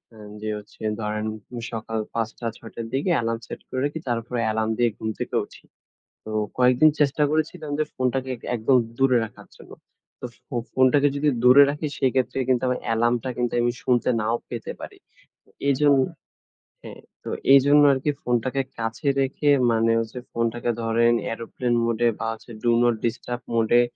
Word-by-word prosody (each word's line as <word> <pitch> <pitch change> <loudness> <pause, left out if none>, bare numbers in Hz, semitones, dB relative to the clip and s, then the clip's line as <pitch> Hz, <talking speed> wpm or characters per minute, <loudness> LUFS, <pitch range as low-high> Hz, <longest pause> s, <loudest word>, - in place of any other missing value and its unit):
এ - - -15 0.2
যে 110 - -3
হচ্ছে 105 - -14 0.2
ধরেন 105 0 -2 0.5
সকাল 110 0 -3
০৫ঃ০০, 115 +1 -3
০৬ঃ০০ 115 0 -9
র - - -7
দিকে 145 +7 0
অ্যালার্ম 115 -1 -1
সেট - - -8
করে 130 - -3
রাখি। 150 +2 -3
তারপরে 120 +1 -2
অ্যালার্ম 110 0 0
দিয়ে 120 -1 +4
ঘুম 110 - -3
থেকে - - -4
উঠি। - - -17 0.6
তো 110 - -6 0.3
কয়েকদিন 125 +5 +5
চেষ্টা 145 +1 +2
করেছিলাম 155 0 -2
যে - - +3
ফোনটাকে 130 +1 -1 0.2
একদম 115 +4 +2 0.2
দূরে 135 -2 +4
রাখার 110 - -14
জন্য। - - -15 0.5
তো - - -4 0.2
ফো 125 - -7 0.2
ফোনটাকে 130 +2 +4
যদি 150 +1 +2
দূরে 130 +3 +8
রাখি 150 +1 -4
সেক্ষেত্রে 130 0 +1
কিন্তু 130 0 +2 0.2
অ্যালার্মটা 120 +2 +1
কিন্তু 120 -1 -1
আমি 120 0 +2
শুনতে 125 0 +2
নাও 115 +2 0
পেতে 115 -2 -5
পারি। - - -9 0.5
আ - - -25 0.2
এইজন্য 140 0 +4 0.8
হ্যাঁ, - - -11 0.2
তো - - -6 0.2
এইজন্য 145 +2 +6
আরকি 135 +3 0
ফোনটাকে 125 +3 0 0.2
কাছে 115 +5 -4
রেখে 135 +2 0 0.2
মানে 115 0 +2
হচ্ছে 115 +2 -5
ফোনটাকে 115 +1 -1
ধরেন 115 +1 +3 0.2
aeroplane 120 +1 -2
mode 115 0 -1
এ - - +4
বা, 115 - -2 0.4
do 120 - +4
not 120 -1 +3
disturb 120 +1 -3
mode 115 -1 +1
A - - +5
120 Hz, 165 wpm, -24 LUFS, 115-135 Hz, 0.8 s, দূরে